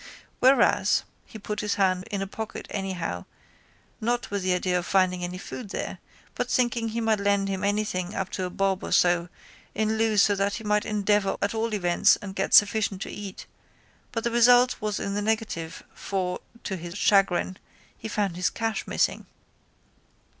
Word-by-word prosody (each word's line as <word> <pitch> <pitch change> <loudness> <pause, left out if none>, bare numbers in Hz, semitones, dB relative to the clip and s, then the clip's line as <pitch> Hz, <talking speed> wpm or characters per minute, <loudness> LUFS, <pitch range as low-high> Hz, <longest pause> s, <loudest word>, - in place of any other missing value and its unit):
Whereas. 265 +2 +4 0.2
He - - -10
put 210 0 -5
his 210 -1 -1
hand 185 -2 +1
in 200 -3 -2
a - - -3
pocket 220 +3 -6
anyhow 180 - -3 0.7
not 240 +1 -1
with 200 -1 -1
the 185 0 +1
idea 180 0 0
of 175 - -6
finding 185 -2 +2
any 180 +1 -4
food 205 +3 -8
there - - -4 0.3
but - - -3
thinking 240 -2 +1
he 225 +1 -3
might 220 -2 +1
lend 200 0 +1
him 190 0 -3
anything 200 -2 -1
up 190 -1 -3
to 185 - -2
a - - -3
bob 195 0 0
or - - -5
so 175 0 +3 0.5
in 220 +1 0
lieu 220 -1 +2
so 205 0 +5
that 200 0 0
he 225 - -6
might 210 0 +1
endeavour 205 -1 +1
at 200 - -1
all 225 +1 -1
events 175 -3 +4
and 195 -2 -8
get 195 - +2
sufficient 205 -2 +4
to - - -7
eat 200 -2 -8 0.7
but 230 -2 -3
the 235 - 0
result 245 +1 +5
was 210 -1 -2
in 200 - -3
the 205 - -1
negative 210 -6 -2
for, 185 -2 -3 0.2
to 190 - -3
his 175 +2 -7
chagrin, 190 -3 +2 0.4
he - - -7
found 205 -4 -1
his 180 0 +1
cash 225 -1 -3
missing. - - 0
200 Hz, 180 wpm, -26 LUFS, 185-220 Hz, 0.7 s, so